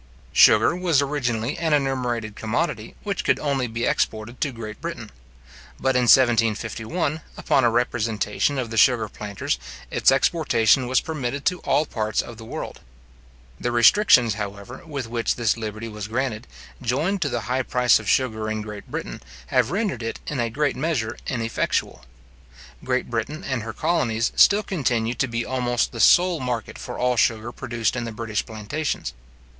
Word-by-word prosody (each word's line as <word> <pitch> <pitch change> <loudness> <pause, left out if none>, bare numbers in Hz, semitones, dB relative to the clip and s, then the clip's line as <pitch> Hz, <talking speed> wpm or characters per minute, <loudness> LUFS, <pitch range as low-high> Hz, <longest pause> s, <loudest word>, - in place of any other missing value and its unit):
Sugar - - +6
was 175 -5 +2
originally 130 -4 -1
an 160 -2 +1
enumerated 125 -6 -1
commodity, 115 +12 -2
which 200 -3 -2
could - - +2
only 140 -4 -1
be 115 +1 -3
exported 110 +3 -1
to 145 - 0
Great 110 -1 -8
Britain; 165 -10 -6 0.7
but 130 -1 +1
in 125 -1 +3
1751, 120 - +2 0.2
upon 135 - +2
a 120 - +5
representation 115 +2 0
of 120 -3 -3
the 115 - -4
sugar 115 0 +4
planters, 100 - -4 0.3
its - - +4
exportation 135 - +3
was 130 - +2
permitted 140 -3 -4
to 180 0 +1
all 155 - +1
parts 110 -5 -2
of 120 - -3
the 115 - -10
world. - - -6 0.8
The 120 - -1
restrictions, 120 - +5
however, 100 +3 -7
with 140 -5 -4
which 115 0 -1
this 120 -3 +1
liberty 110 0 -5
was 105 -2 -6
granted, 120 0 -2 0.3
joined 150 +11 0
to 145 - +1
the 120 -2 -2
high 125 +3 -1
price 125 -1 +3
of 105 -1 -5
sugar 110 -4 +1
in 110 0 -3
Great 105 -1 -9
Britain, - - -5 0.3
have - - +3
rendered 195 - -1
it 115 0 -4
in 150 - -3
a 120 -1 0
great 145 +5 0
measure 130 -6 -1
ineffectual. 115 - -2 0.8
Great 130 0 -1
Britain 120 +8 -3
and 130 -3 -2
her 110 +1 -5
colonies 115 -7 0
still 205 +1 +6
continue 120 - 0
to 130 +2 -1
be 115 -1 -3
almost 125 -2 0
the 115 - -8
sole 175 +8 +5
market 120 -4 -4
for - - -6
all 125 0 +1
sugar 110 +1 +1
produced 120 -2 -2
in 120 -1 -3
the 115 - -5
British 110 -1 -3
plantations. 110 +8 -4
120 Hz, 165 wpm, -23 LUFS, 110-140 Hz, 0.8 s, Sugar